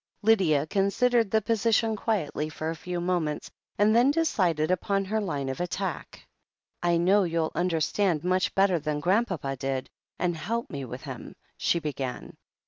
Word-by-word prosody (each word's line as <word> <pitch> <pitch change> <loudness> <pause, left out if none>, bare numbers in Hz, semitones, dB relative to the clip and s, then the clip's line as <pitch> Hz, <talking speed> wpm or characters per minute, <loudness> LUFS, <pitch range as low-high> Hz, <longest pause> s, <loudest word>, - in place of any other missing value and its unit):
Lydia 180 -10 +4
considered 220 +6 +2
the 220 +1 +2
position 225 0 +2
quietly 185 -8 -1
for 155 +1 -4
a - - -5
few 175 +2 -4
moments, 175 -4 -1 0.3
and 210 +2 +4
then 245 +3 +5
decided 185 - +1
upon 195 +2 0
her 215 +3 -1
line 145 -9 -2
of 130 +3 -4
attack. 180 0 -4 0.6
"I 175 -1 +2
know 190 +5 +4
you'll 165 -3 0
understand 175 0 +1
much 185 +1 +1
better 195 -3 +3
than 150 -1 -2
Grand 195 +10 +2
papa 140 -8 -3
did, 135 0 -3 0.3
and 175 -1 0
help 230 +8 -3
me 140 -2 -4
with 120 - -8
him," - - -8 0.2
she - - +1
began. 135 -6 -5
180 Hz, 160 wpm, -27 LUFS, 155-205 Hz, 0.6 s, then